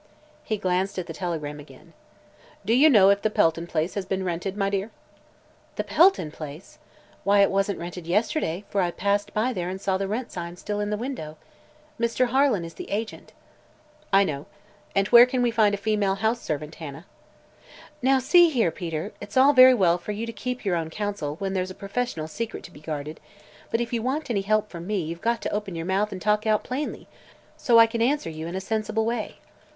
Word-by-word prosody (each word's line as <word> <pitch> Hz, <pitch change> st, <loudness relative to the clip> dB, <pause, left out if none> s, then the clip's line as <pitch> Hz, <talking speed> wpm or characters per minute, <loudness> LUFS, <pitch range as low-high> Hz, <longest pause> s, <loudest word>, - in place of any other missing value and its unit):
He 215 Hz, -, -2 dB
glanced 190 Hz, 0 st, -1 dB
at 185 Hz, -, -2 dB
the -, -, -7 dB
telegram 155 Hz, -5 st, -4 dB
again. 145 Hz, -, -15 dB, 0.7 s
"Do 220 Hz, -, +2 dB
you 285 Hz, +6 st, +6 dB
know 200 Hz, -7 st, +7 dB
if 200 Hz, 0 st, +1 dB
the 215 Hz, -, +1 dB
Pelton 165 Hz, -4 st, +1 dB
place 160 Hz, +1 st, -1 dB
has 200 Hz, -, -2 dB
been 190 Hz, 0 st, -2 dB
rented, 185 Hz, +2 st, -3 dB
my 195 Hz, -1 st, +1 dB
dear?" 200 Hz, +2 st, -2 dB, 0.9 s
"The -, -, -2 dB
Pelton 330 Hz, -, +3 dB
place? 155 Hz, -, -10 dB, 0.4 s
Why, 200 Hz, 0 st, +4 dB
it 200 Hz, -, +4 dB
wasn't 195 Hz, +1 st, 0 dB
rented 175 Hz, 0 st, -7 dB
yesterday, 195 Hz, -, 0 dB
for 200 Hz, -, +1 dB
I 175 Hz, -, +1 dB
passed 200 Hz, +3 st, -1 dB
by 235 Hz, +4 st, +1 dB
there 180 Hz, -4 st, -3 dB
and 190 Hz, +1 st, -5 dB
saw 190 Hz, -1 st, -1 dB
the 195 Hz, -, -1 dB
rent 230 Hz, +5 st, -3 dB
sign 170 Hz, -1 st, -6 dB
still 205 Hz, +3 st, -4 dB
in 205 Hz, 0 st, -1 dB
the 210 Hz, -, -1 dB
window. 205 Hz, -, -6 dB, 0.6 s
Mr. 235 Hz, +2 st, +1 dB
Harlan 260 Hz, -8 st, +2 dB
is 165 Hz, -, -9 dB
the -, -, -9 dB
agent." 215 Hz, +2 st, -4 dB, 0.8 s
"I 195 Hz, +1 st, +6 dB
know. 145 Hz, -6 st, -4 dB, 0.5 s
And 195 Hz, 0 st, +2 dB
where 240 Hz, 0 st, +9 dB
can 250 Hz, -1 st, 0 dB
we 240 Hz, -, +2 dB
find 215 Hz, -3 st, +3 dB
a -, -, -6 dB
female 205 Hz, -2 st, 0 dB
house 220 Hz, +3 st, 0 dB
servant, 150 Hz, 0 st, -4 dB
Hannah?" 155 Hz, +2 st, -8 dB, 1.0 s
"Now, 265 Hz, +2 st, +4 dB
see 345 Hz, +6 st, +5 dB
here, 235 Hz, -, +1 dB
Peter; 165 Hz, -1 st, -4 dB
it's 205 Hz, +4 st, -6 dB
all 275 Hz, +3 st, +6 dB
very 255 Hz, -1 st, +8 dB
well 180 Hz, -5 st, +3 dB
for 210 Hz, +4 st, -5 dB
you 220 Hz, +3 st, -4 dB
to 230 Hz, -, -6 dB
keep 250 Hz, +2 st, -5 dB
your 185 Hz, -3 st, +1 dB
own 160 Hz, -1 st, -3 dB
counsel, 200 Hz, -6 st, -3 dB
when 195 Hz, +3 st, -3 dB
there's 185 Hz, -1 st, -1 dB
a 185 Hz, -, -9 dB
professional 200 Hz, -6 st, -3 dB
secret 225 Hz, +7 st, -5 dB
to -, -, -11 dB
be -, -, -14 dB
guarded, 155 Hz, 0 st, -5 dB, 0.5 s
but 230 Hz, -, 0 dB
if 240 Hz, 0 st, -3 dB
you 230 Hz, -, 0 dB
want 265 Hz, +3 st, -2 dB
any 200 Hz, -4 st, +1 dB
help 215 Hz, +2 st, +1 dB
from 170 Hz, 0 st, -8 dB
me 210 Hz, -1 st, 0 dB
you've 165 Hz, +2 st, -6 dB
got 235 Hz, 0 st, 0 dB
to -, -, -3 dB
open 205 Hz, -3 st, -3 dB
your 165 Hz, 0 st, -4 dB
mouth 195 Hz, +3 st, 0 dB
and 185 Hz, -, -7 dB
talk 210 Hz, +1 st, +1 dB
out 215 Hz, -1 st, +2 dB
plainly, 270 Hz, +4 st, -4 dB, 0.5 s
so 235 Hz, -2 st, +3 dB
I 230 Hz, -, +9 dB
can 230 Hz, 0 st, -3 dB
answer 255 Hz, -, +1 dB
you 160 Hz, +1 st, -6 dB
in 170 Hz, -, -5 dB
a 190 Hz, -, -2 dB
sensible 220 Hz, +2 st, -1 dB
way." 230 Hz, -1 st, -3 dB
200 Hz, 215 wpm, -25 LUFS, 175-230 Hz, 1.0 s, where